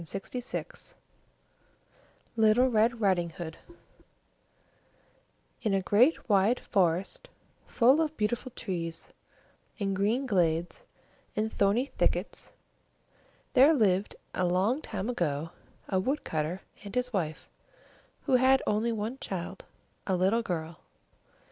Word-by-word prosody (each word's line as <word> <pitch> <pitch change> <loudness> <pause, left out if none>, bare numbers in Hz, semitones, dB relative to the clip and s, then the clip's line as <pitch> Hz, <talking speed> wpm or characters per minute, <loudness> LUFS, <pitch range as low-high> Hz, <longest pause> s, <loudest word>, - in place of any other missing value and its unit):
LITTLE 225 +3 +4
RED 230 0 +2
RIDING 185 -5 +2
HOOD 165 -1 -8 2.0
In 215 -5 +1
a 195 - +1
great 245 - +3
wide 205 +3 +3
forest, 185 -2 0 0.4
full 260 +6 +4
of 315 -1 -2
beautiful 230 +4 -1
trees, 170 -5 -4 0.7
and 195 -1 -1
green 220 +8 +1
glades, 175 - 0 0.5
and 220 +1 -1
thorny 205 +6 +2
thickets, - - -2 1.0
there 280 +5 +7
lived 200 -5 +2 0.2
a 185 - -1
long 195 - +1
time 205 -6 -4
ago 165 -9 -2 0.4
a 190 - +1
wood 270 +10 -1
cutter 160 +4 -2 0.2
and 205 +2 -8
his 250 0 -1
wife, 160 -6 -2 0.8
who 265 -3 +3
had 260 +1 +4
only 215 +3 +1
one 225 +4 -3
child, 190 0 -5 0.4
a 190 - +2
little 190 +6 +2
girl. 165 -6 -4
205 Hz, 110 wpm, -29 LUFS, 180-240 Hz, 2.0 s, there